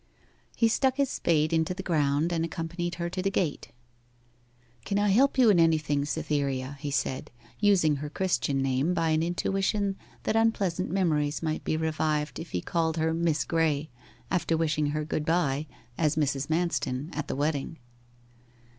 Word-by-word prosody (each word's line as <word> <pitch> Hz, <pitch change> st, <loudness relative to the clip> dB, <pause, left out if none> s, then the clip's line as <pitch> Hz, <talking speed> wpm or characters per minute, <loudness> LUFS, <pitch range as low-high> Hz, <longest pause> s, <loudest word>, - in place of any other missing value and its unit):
He 230 Hz, -, +3 dB
stuck 260 Hz, +3 st, +2 dB
his 280 Hz, -2 st, +1 dB
spade 155 Hz, -1 st, +1 dB
into 165 Hz, +2 st, +1 dB
the 190 Hz, -, -6 dB
ground, 155 Hz, -1 st, +1 dB
and 165 Hz, -1 st, 0 dB
accompanied 170 Hz, +1 st, -3 dB
her 170 Hz, -1 st, -3 dB
to 185 Hz, -, -2 dB
the 195 Hz, -, +1 dB
gate. 175 Hz, -6 st, -2 dB, 1.1 s
'Can 200 Hz, -, -1 dB
I 205 Hz, 0 st, +2 dB
help 265 Hz, +9 st, +4 dB
you 245 Hz, -4 st, +6 dB
in 180 Hz, -, +4 dB
anything, 155 Hz, -3 st, +2 dB
Cytherea?' 145 Hz, -3 st, -2 dB
he 145 Hz, 0 st, -4 dB
said, 135 Hz, -2 st, -2 dB, 0.3 s
using 185 Hz, -8 st, +3 dB
her 150 Hz, +2 st, -5 dB
Christian 140 Hz, -6 st, 0 dB
name 135 Hz, +6 st, +1 dB
by 165 Hz, -, +1 dB
an 155 Hz, 0 st, +2 dB
intuition 195 Hz, +3 st, 0 dB, 0.3 s
that -, -, 0 dB
unpleasant 200 Hz, -6 st, +1 dB
memories 155 Hz, -5 st, 0 dB
might 155 Hz, -1 st, -2 dB
be 155 Hz, -, 0 dB
revived 155 Hz, -3 st, -1 dB
if 165 Hz, -, -7 dB
he 90 Hz, -, -2 dB
called 165 Hz, -, -1 dB
her 160 Hz, 0 st, +1 dB
Miss 165 Hz, -2 st, +1 dB
Graye 155 Hz, -2 st, 0 dB, 0.4 s
after 165 Hz, -3 st, +1 dB
wishing 155 Hz, -2 st, +1 dB
her 150 Hz, +1 st, -2 dB
good 155 Hz, 0 st, -2 dB
bye 155 Hz, -3 st, 0 dB, 0.3 s
as 155 Hz, -2 st, +2 dB
Mrs. 140 Hz, -2 st, 0 dB
Manston 160 Hz, -3 st, -1 dB
at 150 Hz, -1 st, -3 dB
the -, -, -3 dB
wedding. 145 Hz, +2 st, -1 dB
160 Hz, 165 wpm, -28 LUFS, 150-180 Hz, 1.1 s, you